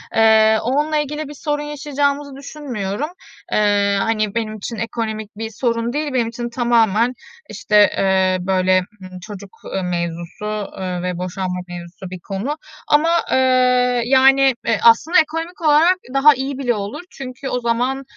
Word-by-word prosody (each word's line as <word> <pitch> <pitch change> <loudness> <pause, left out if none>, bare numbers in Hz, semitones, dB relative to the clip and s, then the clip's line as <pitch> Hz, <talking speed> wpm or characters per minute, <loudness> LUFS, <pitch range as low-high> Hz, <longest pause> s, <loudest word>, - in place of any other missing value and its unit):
Eee, 220 0 +5
onunla 295 +5 0
ilgili 300 +1 -3
bir 295 - -9
sorun 295 +1 -3
yaşayacağımızı 285 -1 -2
düşünmüyorum. 275 -4 -5 0.4
Eee, 205 -1 +2
hani, 215 -2 -1
benim 220 -2 -2
için 215 +3 -6
ekonomik 220 -2 -4
bir 225 0 -4
sorun 230 +1 -2
değil, 295 -1 -2
benim 240 -3 +1
için 235 +1 -5
tamamen, 235 -1 +2 0.4
işte, 210 - -2 0.2
eee, 190 -1 +2
böyle, 185 -1 +3 0.2
ımm, 185 -1 -10
çocuk, 200 +1 -10 0.3
eee, 195 - 0
mevzusu, 180 +4 -4
eee, 180 -2 -3
ve 180 -1 -3
boşanma 180 0 -3
mevzusu 175 +1 -9
bir 185 0 -8
konu 200 - -4 0.3
ama, 300 +3 +3 0.2
eee, - - +3 0.7
yani, 270 +1 +5
eee, 225 - +1
aslında 235 +10 +5
ekonomik 325 +3 -2
olarak 320 +4 +4 0.2
daha 280 +2 +6
iyi 270 0 -4
bile 255 -3 0
olur. 205 +4 -5
Çünkü 265 0 -7
o 250 - -1
zaman, 245 +3 -1
230 Hz, 150 wpm, -19 LUFS, 200-275 Hz, 0.7 s, daha